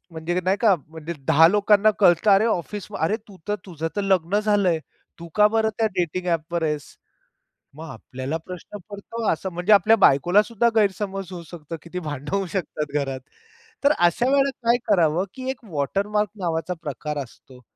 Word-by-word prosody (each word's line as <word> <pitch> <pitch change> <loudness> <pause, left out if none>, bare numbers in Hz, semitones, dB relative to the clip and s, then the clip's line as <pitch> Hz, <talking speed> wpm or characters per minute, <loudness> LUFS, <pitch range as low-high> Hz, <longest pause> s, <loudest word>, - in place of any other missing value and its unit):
म्हणजे 165 +2 -2
नाही 190 +2 +2
का? 215 -5 +5
म्हणजे 160 +1 -7 0.2
10 160 +2 +7
लोकांना 210 +2 +4
कळतं 180 +1 +5
"अरे 200 +2 +5
ऑफिस 205 0 -2
अरे 165 +7 +1
तू 195 - -13
त, - - -1 0.2
तुझंतर 165 +2 -4
लग्न 190 0 +1
झालंय. 205 -6 +2 0.4
तू 170 0 -9
का 210 0 +7
बरं 220 0 +1
त्या 225 - +3
डेटिंग 180 0 -2
ॲप 165 -1 -1
वर 170 - 0
आहेस? 150 -2 -2 0.9
मग 160 +1 -9
आपल्याला 130 +5 -5
प्रश्न 180 +3 -9
पडतो? 210 +2 -5
असं 190 +4 -3
म्हणजे 180 +5 +3
आपल्या 220 +2 +5
बायकोला 175 +9 +4
सुद्धा 235 +1 +1
गैरसमज 195 -2 0
होऊ 175 -1 -7
शकतो. 165 -1 -7
किती 180 +2 -6
भांडणं 145 +2 -4
होऊ 195 -1 0
शकतात 150 -5 -3
घरात. 135 -1 -4 0.6
तर 280 - +5
अशा 175 +9 +3
वेळेला 275 0 +3 0.2
काय 240 - +5
करावं, 175 -3 +3
की 260 0 -6
एक 260 -2 -11
वॉटरमार्क 200 +8 0
नावाचा 165 -1 -2
प्रकार 150 0 -4
असतो. 125 0 -17
180 Hz, 170 wpm, -23 LUFS, 160-210 Hz, 0.9 s, 10